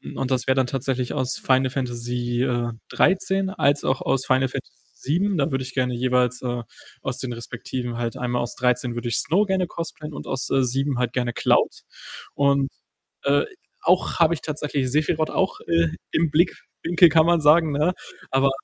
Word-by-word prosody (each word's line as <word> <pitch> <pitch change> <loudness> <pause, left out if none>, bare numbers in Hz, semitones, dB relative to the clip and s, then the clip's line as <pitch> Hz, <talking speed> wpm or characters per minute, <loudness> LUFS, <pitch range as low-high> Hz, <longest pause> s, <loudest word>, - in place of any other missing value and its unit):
und 135 0 -2
das 130 0 0
wär 130 - +3
dann 130 -1 +3
tatsächlich 130 -1 -2
aus 130 -3 -1
Final 130 0 +2
Fantasy, 120 -1 -2
äh, 120 -2 0 0.2
13 190 0 +1
als 145 -5 +1
auch 130 - 0
aus 135 -1 0
Final 130 0 +3
Fantasy 135 +1 -6 0.2
7. 180 +7 0
Da 145 +1 +1
würde 135 0 -1
ich 130 0 -8
gerne 125 -2 +1
jeweils, 125 0 +1
äh, 120 -1 -3 0.4
aus - - -3
den 130 -2 -4
Respektiven 120 +1 -5
halt 120 -1 -3
einmal 125 -1 -1
aus 120 - -4
13 125 -1 0
würde 120 0 -3
ich 115 - 0
Snow 175 +9 +2
gerne 190 -3 0
cosplayen 160 -3 -6
und - - -7
aus, 135 0 -3
äh, 135 -1 +3
7 135 +1 0
halt 125 -1 -1
gerne 120 -2 -1
Cloud - - +1 0.5
und, 140 -1 +2 0.5
äh, 140 +1 +3 0.4
auch - - +2
habe 165 0 +5
ich 155 - -5
tatsächlich 145 -3 -2
Sephiroth 155 +2 +1
auch, 190 - 0
äh, 165 0 +3 0.2
im 160 -2 +1
Blickwinkel, 170 +1 +3
kann 160 +1 +5
man 170 -1 +3
sagen, 155 +1 +5
ne? 155 +6 +2 0.4
Aber 135 +1 +3
135 Hz, 185 wpm, -23 LUFS, 125-155 Hz, 0.5 s, habe